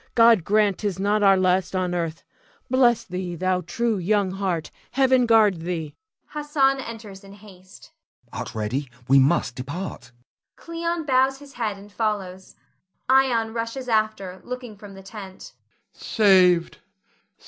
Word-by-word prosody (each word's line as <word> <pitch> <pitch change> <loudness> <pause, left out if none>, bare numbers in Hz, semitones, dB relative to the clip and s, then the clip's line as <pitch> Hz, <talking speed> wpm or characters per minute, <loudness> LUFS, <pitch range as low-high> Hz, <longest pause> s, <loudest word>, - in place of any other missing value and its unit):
God 230 -5 +6
grant 205 0 +2
'tis 205 -4 -2
not 205 +2 +1
our 195 -1 +5
last 185 0 +1
on 180 -1 -1
earth! 165 -2 -3 0.5
Bless 245 -3 +4
thee, 180 -1 -5
thou 185 +1 0
true 220 +5 -1
young 200 +1 +1
heart! 185 -5 -3 0.2
Heaven 260 -2 +3
guard 215 -5 +5
thee! 165 -3 -4 0.3
[Hassan 295 -2 0
enters 220 -5 -9
in 195 0 -13
haste. 190 -2 -16 0.4
Hassan. - - -6
Art - - -6
ready? 120 +6 -3 0.2
We 135 +1 +6
must 135 -1 +2
depart. 130 0 -7 0.4
[Cleon 335 0 -4
bows 265 0 +2
his 280 0 -14
head 215 -4 -3
and 205 +1 -14
follows. 200 -4 -3 0.5
Ion 245 -4 +3
rushes 230 +3 -4
after, 215 -5 -1
looking 250 -3 -7
from 200 -1 -12
the 195 - -12
tent.] 195 -1 -10 0.4
Ion. - - -22
Saved! 185 -5 +3
200 Hz, 145 wpm, -23 LUFS, 180-235 Hz, 0.5 s, God